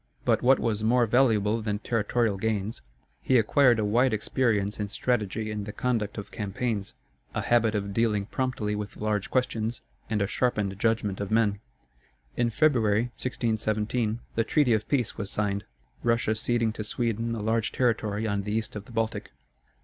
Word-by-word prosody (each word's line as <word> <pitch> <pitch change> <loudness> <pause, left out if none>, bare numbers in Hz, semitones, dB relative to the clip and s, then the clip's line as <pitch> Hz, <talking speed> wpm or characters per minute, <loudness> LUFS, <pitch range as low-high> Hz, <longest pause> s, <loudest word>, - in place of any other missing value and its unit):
But - - +3
what 130 +2 +5
was 110 -2 -1
more 120 +2 +4
valuable 110 -2 +3
than 105 -1 -1
territorial 110 -1 0
gains, 110 - -2 0.4
he 130 - +3
acquired 120 +2 +4
a 110 - 0
wide 120 +3 +3
experience 110 -2 0
in 105 - -1
strategy 110 -1 -1
and 105 -1 -3
the - - -4
conduct 115 -3 -1
of 105 - -7
campaigns, 105 -1 -3 0.4
a - - 0
habit 115 -2 +3
of 100 -1 -2
dealing 105 -2 +1
promptly 125 -3 -2
with 105 -1 -5
large 105 -2 -1
questions, 115 -3 -1 0.3
and 110 -1 0
a 100 - +2
sharpened 105 -3 -1
judgment 105 -3 0
of 100 - -3
men. 110 -2 +2 0.8
In 120 -1 +1
February, 115 -3 +2
1617, 110 -1 -1
the 115 - +1
treaty 130 +1 +3
of 110 0 -1
peace 125 -6 0
was 100 -2 -3
signed, 105 0 -1 0.4
Russia 115 -2 +2
ceding 115 0 0
to 110 - -5
Sweden 115 +1 -1
a 110 - -4
large 110 0 +1
territory 110 -3 0
on 100 -2 0
the 105 +1 -4
east 110 0 -2
of 105 -1 -6
the - - -14
Baltic. 115 -1 -2
110 Hz, 170 wpm, -27 LUFS, 105-120 Hz, 0.8 s, what